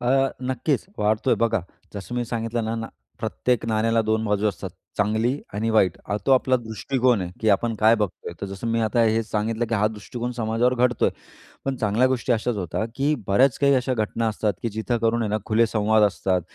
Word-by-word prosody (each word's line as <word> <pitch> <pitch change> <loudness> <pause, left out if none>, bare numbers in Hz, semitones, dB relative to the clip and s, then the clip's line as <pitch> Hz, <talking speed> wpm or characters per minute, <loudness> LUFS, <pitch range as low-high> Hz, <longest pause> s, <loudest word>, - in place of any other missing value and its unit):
अ, 135 +2 +2
नक्कीच 130 +4 -1
वाढतोय 110 +4 +2
बघा. 115 -4 +1 0.3
जसं 100 +3 -6
मी 120 -1 -1
सांगितलं 115 0 -2
ना 110 +1 -2
ना, 115 0 -4 0.3
प्रत्येक 115 +1 -1
नाण्याला 115 +1 +2
2 110 0 0
बाजू 105 0 +1
असतात, - - -5 0.3
चांगली 110 +6 +1 0.2
आणि 110 +2 -1
वाईट. 95 -5 +3
अ, 100 - -1
तो 135 - +5
आपला 130 0 +4
दृष्टिकोन 120 0 0
आहे 85 - -5
की 110 - +1
आपण 115 +3 +1
काय 110 +2 +6
बघतोय. 105 -5 -3
तर 100 - -3
जसं 95 +4 -6
मी, 115 0 +1
आता 110 +1 +2
हेच 110 0 +1
सांगितलं 110 +2 -1
की 115 - 0
हा 105 0 +2
दृष्टिकोन 120 +3 -5
समाजावर 115 +2 +1
घडतोय. 125 - +1 0.6
पण 135 -1 -1
चांगल्या 115 +2 +2
गोष्टी 130 -1 -1
अशाच 115 +1 -1
होता, 95 +4 -2
की 140 +2 +1
बऱ्याच 125 +7 +4
काही 140 -1 +4
अशा 130 0 0
घटना 115 0 -1
असतात, 105 -1 -1
की 115 - -1
जिथं 110 +3 -2
करून 115 +1 +1
आहे 110 - -1
ना, 105 - +1
खुले 115 +2 +3
संवाद 110 0 +2
असतात. 95 -2 +1
115 Hz, 205 wpm, -24 LUFS, 105-120 Hz, 0.6 s, काय